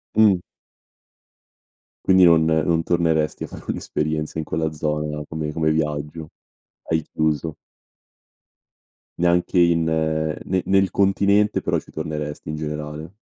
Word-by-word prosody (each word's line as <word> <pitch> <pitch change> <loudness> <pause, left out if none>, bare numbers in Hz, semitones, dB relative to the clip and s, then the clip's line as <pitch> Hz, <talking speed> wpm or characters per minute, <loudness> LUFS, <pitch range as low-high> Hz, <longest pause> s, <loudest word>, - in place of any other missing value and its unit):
Mh. 105 -4 +5 1.7
Quindi 95 -1 +6
non 85 -2 +6
non 80 +1 +2
torneresti 80 -3 +1
a - - -5
fare - - -10
un'esperienza 75 0 -2
in 80 - -3
quella 80 0 -1
zona 75 0 -2
come 80 -1 -4
come 80 0 0
viaggio, 75 0 -2 0.6
hai 80 -1 +2
chiuso? 80 0 -1 1.6
Neanche 90 +1 +2
in 85 -1 +4
nel 80 +2 -1
nel 95 0 +3
continente 100 +1 +3
però - - 0
ci - - -9
torneresti 75 -1 -5
in 75 - -3
generale? 75 +1 -5
80 Hz, 120 wpm, -22 LUFS, 75-85 Hz, 1.7 s, Quindi